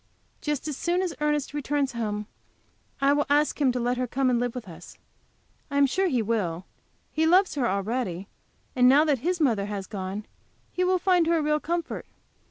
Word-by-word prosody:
Just 295 Hz, -1 st, -2 dB
as 300 Hz, -, -3 dB
soon 350 Hz, +6 st, 0 dB
as 360 Hz, -, -2 dB
Ernest 295 Hz, -1 st, 0 dB
returns 290 Hz, -1 st, -1 dB
home 210 Hz, -3 st, -3 dB, 0.8 s
I 275 Hz, +1 st, +4 dB
will 290 Hz, 0 st, +1 dB
ask 295 Hz, +1 st, +2 dB
him 265 Hz, -3 st, +4 dB
to 250 Hz, -, -1 dB
let 245 Hz, +1 st, 0 dB
her 255 Hz, 0 st, -1 dB
come 260 Hz, +1 st, +1 dB
and 240 Hz, -, +2 dB
live 245 Hz, 0 st, -2 dB
with 245 Hz, -5 st, -6 dB
us. 175 Hz, 0 st, -12 dB, 0.7 s
I 280 Hz, -, -2 dB
am 280 Hz, -, +6 dB
sure 375 Hz, +8 st, +1 dB
he 250 Hz, -9 st, +1 dB
will; 190 Hz, -6 st, -2 dB, 0.5 s
he 320 Hz, +1 st, +1 dB
loves 370 Hz, +4 st, +4 dB
her 265 Hz, -5 st, 0 dB
already, 200 Hz, -2 st, -2 dB, 0.5 s
and 250 Hz, 0 st, +6 dB
now 290 Hz, +4 st, +6 dB
that 290 Hz, -5 st, +2 dB
his 350 Hz, +7 st, -1 dB
mother 230 Hz, -10 st, +2 dB
has 200 Hz, -2 st, -4 dB
gone 195 Hz, +1 st, -5 dB, 0.5 s
he 365 Hz, -, -1 dB
will 370 Hz, 0 st, +3 dB
find 360 Hz, -2 st, +3 dB
her 335 Hz, 0 st, +3 dB
a 315 Hz, -, 0 dB
real 300 Hz, 0 st, +1 dB
comfort. 340 Hz, +1 st, -3 dB
270 Hz, 200 wpm, -26 LUFS, 225-305 Hz, 0.8 s, am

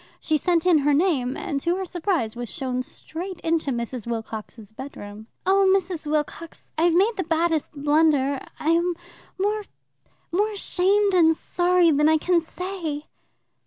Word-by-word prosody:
She 315 Hz, -, 0 dB
sent 340 Hz, +2 st, +1 dB
in 345 Hz, -4 st, +5 dB
her 290 Hz, 0 st, +3 dB
name, 280 Hz, -7 st, +1 dB
and 330 Hz, -8 st, -3 dB
to 340 Hz, +5 st, 0 dB
her 380 Hz, 0 st, -3 dB
surprise 345 Hz, -, -1 dB
was 240 Hz, -1 st, -5 dB
shown 255 Hz, -1 st, -3 dB
straight 350 Hz, +7 st, -7 dB
into 325 Hz, -3 st, 0 dB
Mrs. 235 Hz, -2 st, -4 dB
Wilcox's 220 Hz, -2 st, -6 dB
bedroom. 220 Hz, -4 st, -9 dB, 0.2 s
"Oh, 385 Hz, 0 st, +4 dB
Mrs. 350 Hz, -5 st, -5 dB
Wilcox, 310 Hz, +2 st, -3 dB
I 325 Hz, -, +2 dB
have 340 Hz, -1 st, +3 dB
made 420 Hz, +5 st, +3 dB
the 375 Hz, -, 0 dB
baddest 325 Hz, -1 st, 0 dB
blunder. 290 Hz, -2 st, +2 dB, 0.2 s
I 310 Hz, -, -1 dB
am 340 Hz, +1 st, +2 dB, 0.4 s
more, 420 Hz, +2 st, 0 dB, 0.7 s
more 410 Hz, +5 st, +2 dB
ashamed 400 Hz, +1 st, +1 dB
and 325 Hz, -3 st, +5 dB
sorry 355 Hz, -1 st, +2 dB
than 300 Hz, +1 st, +4 dB
I 315 Hz, -, +5 dB
can 350 Hz, +2 st, +2 dB
say." 335 Hz, -3 st, -5 dB
325 Hz, 160 wpm, -24 LUFS, 280-360 Hz, 0.7 s, in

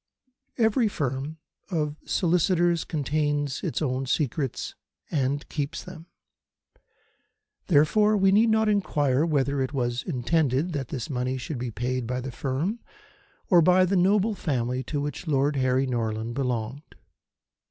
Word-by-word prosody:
Every 225 Hz, 0 st, +3 dB
firm 140 Hz, -3 st, -3 dB, 0.3 s
of 150 Hz, -5 st, -1 dB
solicitors 175 Hz, -1 st, +2 dB
contains 145 Hz, -2 st, -1 dB
its 140 Hz, -, -2 dB
own 130 Hz, -1 st, -1 dB
secrets 135 Hz, -1 st, -1 dB, 0.4 s
and 140 Hz, -1 st, -1 dB
keeps 150 Hz, +2 st, -4 dB
them. 175 Hz, -2 st, -11 dB, 1.6 s
Therefore, 210 Hz, +7 st, +4 dB
we 195 Hz, -1 st, +4 dB
need 220 Hz, +3 st, +5 dB
not 220 Hz, 0 st, +3 dB
inquire 150 Hz, -8 st, +2 dB
whether 140 Hz, -2 st, +1 dB
it 130 Hz, +2 st, -2 dB
was 120 Hz, -2 st, -1 dB
intended 150 Hz, +2 st, 0 dB
that 135 Hz, -4 st, -3 dB
this 125 Hz, -3 st, -4 dB
money 130 Hz, -1 st, -2 dB
should 130 Hz, +1 st, -5 dB
be 125 Hz, 0 st, -3 dB
paid 125 Hz, +1 st, -2 dB
by 125 Hz, +1 st, -2 dB
the 130 Hz, +1 st, -5 dB
firm 145 Hz, -, -2 dB, 0.7 s
or 175 Hz, -3 st, +6 dB
by 185 Hz, +2 st, +5 dB
the 190 Hz, +2 st, 0 dB
noble 200 Hz, +4 st, +3 dB
family 130 Hz, -, -1 dB
to 145 Hz, -, -2 dB
which 145 Hz, +4 st, -4 dB
Lord 145 Hz, 0 st, +2 dB
Harry 130 Hz, 0 st, +2 dB
Norland 115 Hz, -2 st, -2 dB
belonged. 125 Hz, 0 st, -2 dB
145 Hz, 135 wpm, -26 LUFS, 130-175 Hz, 1.6 s, or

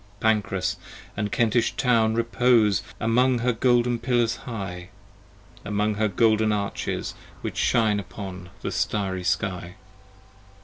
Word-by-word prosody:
Pancrass 100 Hz, -3 st, 0 dB, 0.3 s
& 105 Hz, 0 st, -4 dB
Kentish 120 Hz, 0 st, +2 dB
town 115 Hz, -3 st, +2 dB
repose 115 Hz, -3 st, +3 dB, 0.2 s
Among 125 Hz, +2 st, +3 dB
her 120 Hz, +1 st, +1 dB
golden 120 Hz, 0 st, +2 dB
pillars 120 Hz, -2 st, +1 dB
high: 95 Hz, -5 st, -6 dB, 0.7 s
Among 105 Hz, +1 st, 0 dB
her 110 Hz, +1 st, +1 dB
golden 110 Hz, +2 st, +3 dB
arches 100 Hz, -1 st, -2 dB, 0.3 s
which -, -, -5 dB
Shine 110 Hz, -3 st, +2 dB
upon 90 Hz, -1 st, -8 dB
the -, -, -2 dB
starry 95 Hz, -3 st, -1 dB
sky. 90 Hz, -1 st, -2 dB
110 Hz, 115 wpm, -25 LUFS, 100-115 Hz, 0.7 s, repose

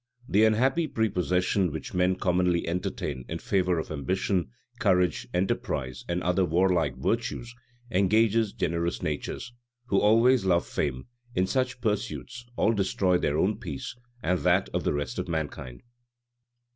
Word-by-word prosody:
The 105 Hz, +3 st, +4 dB
unhappy 130 Hz, +9 st, +2 dB
prepossession 90 Hz, -, +1 dB
which 80 Hz, -, -6 dB
men 90 Hz, 0 st, +2 dB
commonly 90 Hz, -1 st, +1 dB
entertain 85 Hz, -7 st, -3 dB
in -, -, -3 dB
favor 90 Hz, -2 st, +1 dB
of 80 Hz, -, -4 dB
ambition, 85 Hz, +2 st, -1 dB, 0.3 s
courage, 90 Hz, -4 st, +2 dB
enterprise, 65 Hz, -8 st, -2 dB
and 85 Hz, +1 st, -1 dB
other 90 Hz, +2 st, +2 dB
warlike 85 Hz, -4 st, +2 dB
virtues, 120 Hz, +1 st, -2 dB, 0.4 s
engages 110 Hz, +2 st, +3 dB
generous 85 Hz, -1 st, -2 dB
natures, 75 Hz, +10 st, -4 dB, 0.4 s
who 100 Hz, -, +3 dB
always 115 Hz, +3 st, +4 dB
love 90 Hz, -2 st, +2 dB
fame, 65 Hz, -3 st, -2 dB, 0.3 s
in 90 Hz, -, +3 dB
such 125 Hz, +4 st, -1 dB
pursuits 120 Hz, +2 st, -3 dB
all 115 Hz, -, +2 dB
destroy 95 Hz, -3 st, +1 dB
their 75 Hz, +1 st, 0 dB
own 95 Hz, +6 st, +1 dB
peace, 75 Hz, 0 st, -6 dB, 0.3 s
and 90 Hz, +2 st, +1 dB
that -, -, +2 dB
of -, -, -1 dB
the -, -, +2 dB
rest 70 Hz, -4 st, -3 dB
of -, -, -3 dB
mankind. 75 Hz, -6 st, -4 dB
90 Hz, 140 wpm, -27 LUFS, 85-105 Hz, 0.4 s, The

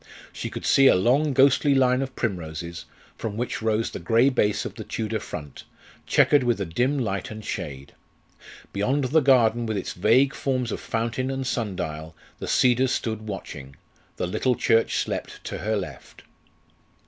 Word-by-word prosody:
She -, -, -5 dB
could -, -, -7 dB
see 135 Hz, 0 st, +5 dB
a -, -, +6 dB
long 130 Hz, +11 st, +2 dB
ghostly 140 Hz, +2 st, +4 dB
line 130 Hz, -1 st, +3 dB
of 130 Hz, -1 st, -5 dB
primroses, 85 Hz, -5 st, -4 dB, 0.3 s
from 110 Hz, -2 st, -4 dB
which 120 Hz, -1 st, -3 dB
rose 110 Hz, 0 st, 0 dB
the -, -, -6 dB
grey 115 Hz, +9 st, +3 dB
base 105 Hz, -6 st, +1 dB
of -, -, -5 dB
the -, -, -8 dB
Tudor 110 Hz, 0 st, -3 dB
front, 75 Hz, -5 st, -8 dB, 0.4 s
checkered 145 Hz, -3 st, +4 dB
with 120 Hz, -3 st, +1 dB
a 100 Hz, -, -1 dB
dim 125 Hz, -, 0 dB
light 100 Hz, -7 st, -2 dB
and 110 Hz, -1 st, -8 dB
shade. 70 Hz, -1 st, -6 dB, 0.8 s
Beyond 130 Hz, +9 st, 0 dB
the 140 Hz, +5 st, +3 dB
garden, 120 Hz, -4 st, +3 dB
with 110 Hz, -2 st, -2 dB
its 95 Hz, -, -4 dB
vague 120 Hz, +9 st, +3 dB
forms 130 Hz, -4 st, -2 dB
of -, -, -3 dB
fountain 120 Hz, +3 st, -2 dB
and 135 Hz, 0 st, -3 dB
sun 115 Hz, -7 st, -2 dB
dial, 80 Hz, -1 st, -5 dB, 0.2 s
the -, -, -5 dB
cedars 125 Hz, +1 st, +3 dB
stood 110 Hz, -2 st, -3 dB
watching; 70 Hz, -9 st, -7 dB, 0.4 s
the -, -, -2 dB
little 125 Hz, +8 st, 0 dB
church 115 Hz, 0 st, +2 dB
slept -, -, -3 dB
to -, -, -5 dB
her 110 Hz, +1 st, -1 dB
left. 95 Hz, -6 st, -7 dB
115 Hz, 170 wpm, -25 LUFS, 95-130 Hz, 0.8 s, a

